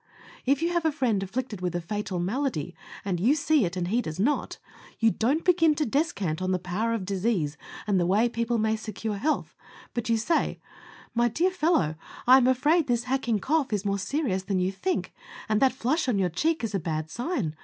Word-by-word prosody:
If 280 Hz, +4 st, +2 dB
you 340 Hz, -, +2 dB
have 345 Hz, -1 st, +1 dB
a 320 Hz, -, +2 dB
friend 245 Hz, -9 st, 0 dB
afflicted 215 Hz, 0 st, -4 dB
with 180 Hz, -1 st, -2 dB
a -, -, +1 dB
fatal 195 Hz, +2 st, -4 dB
malady, 180 Hz, -, -2 dB, 0.3 s
and 185 Hz, -3 st, -1 dB
you 240 Hz, -, +4 dB
see 300 Hz, -5 st, +3 dB
it, 175 Hz, +1 st, -4 dB
and 175 Hz, -1 st, -1 dB
he 235 Hz, +4 st, +2 dB
does 155 Hz, -5 st, -6 dB
not, 275 Hz, +9 st, 0 dB, 0.4 s
you 225 Hz, -1 st, +4 dB
don't 270 Hz, +11 st, 0 dB
begin 330 Hz, -4 st, +4 dB
to 300 Hz, -, 0 dB
descant 215 Hz, -, -1 dB
on 185 Hz, 0 st, 0 dB
the 185 Hz, -, +2 dB
power 190 Hz, +6 st, -1 dB
of 200 Hz, -5 st, -4 dB
disease 190 Hz, -6 st, 0 dB, 0.3 s
and 200 Hz, -3 st, +2 dB
the 175 Hz, -, +1 dB
way 210 Hz, +6 st, +3 dB
people 235 Hz, 0 st, -1 dB
may 220 Hz, 0 st, +1 dB
secure 215 Hz, -1 st, -4 dB
health, 305 Hz, +9 st, -1 dB, 0.4 s
but 240 Hz, -1 st, -3 dB
you 230 Hz, -, +3 dB
say, 320 Hz, +10 st, 0 dB, 0.5 s
"My 240 Hz, 0 st, +3 dB
dear 345 Hz, +10 st, +1 dB
fellow, 315 Hz, -, +2 dB, 0.3 s
I 255 Hz, +2 st, +8 dB
am 255 Hz, -2 st, +4 dB
afraid 290 Hz, +5 st, +3 dB
this 240 Hz, -1 st, +1 dB
hacking 255 Hz, -3 st, 0 dB
cough 300 Hz, -3 st, +1 dB
is 205 Hz, -1 st, -1 dB
more 200 Hz, 0 st, 0 dB
serious 195 Hz, -1 st, -1 dB
than 190 Hz, 0 st, -2 dB
you 185 Hz, +1 st, +1 dB
think, 360 Hz, -, -2 dB, 0.3 s
and 215 Hz, -1 st, +1 dB
that 265 Hz, -1 st, +5 dB
flush 260 Hz, +4 st, 0 dB
on 225 Hz, -, +2 dB
your 185 Hz, -2 st, +2 dB
cheek 310 Hz, -, 0 dB
is 220 Hz, -2 st, -2 dB
a 195 Hz, -, +1 dB
bad 160 Hz, -1 st, -3 dB
sign. 240 Hz, -, -2 dB
225 Hz, 215 wpm, -27 LUFS, 190-275 Hz, 0.5 s, I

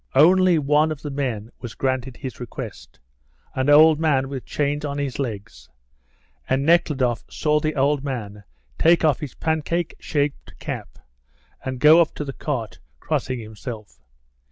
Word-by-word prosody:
Only 180 Hz, +4 st, +6 dB
one 150 Hz, +1 st, +2 dB
of 155 Hz, -, -6 dB
the 145 Hz, -, -4 dB
men 125 Hz, -6 st, -3 dB
was 120 Hz, -3 st, -8 dB
granted 130 Hz, -1 st, -2 dB
his 130 Hz, -3 st, -7 dB
request 120 Hz, -2 st, -8 dB, 0.5 s
an 130 Hz, +2 st, 0 dB
old 155 Hz, +1 st, +7 dB
man 140 Hz, -5 st, +1 dB
with 135 Hz, -2 st, -6 dB
chains 145 Hz, 0 st, -1 dB
on 145 Hz, -1 st, -3 dB
his 140 Hz, -2 st, -3 dB
legs; 105 Hz, -, -6 dB, 0.8 s
and 135 Hz, +1 st, +1 dB
Nekhludoff 140 Hz, -7 st, +2 dB
saw 150 Hz, 0 st, +1 dB
the 155 Hz, 0 st, -2 dB
old 140 Hz, 0 st, +1 dB
man 105 Hz, -7 st, -5 dB, 0.4 s
take 170 Hz, 0 st, +4 dB
off 150 Hz, -5 st, +3 dB
his 145 Hz, -4 st, -7 dB
pancake 160 Hz, +2 st, -1 dB
shaped 145 Hz, -2 st, -3 dB
cap, -, -, -6 dB, 0.7 s
and 130 Hz, -1 st, -4 dB
go 155 Hz, +5 st, +7 dB
up 165 Hz, -, 0 dB
to 150 Hz, -, -4 dB
the 135 Hz, -, -5 dB
cart 125 Hz, -8 st, -4 dB, 0.2 s
crossing 130 Hz, -1 st, -2 dB
himself. 110 Hz, -1 st, -9 dB
140 Hz, 155 wpm, -23 LUFS, 125-155 Hz, 0.8 s, old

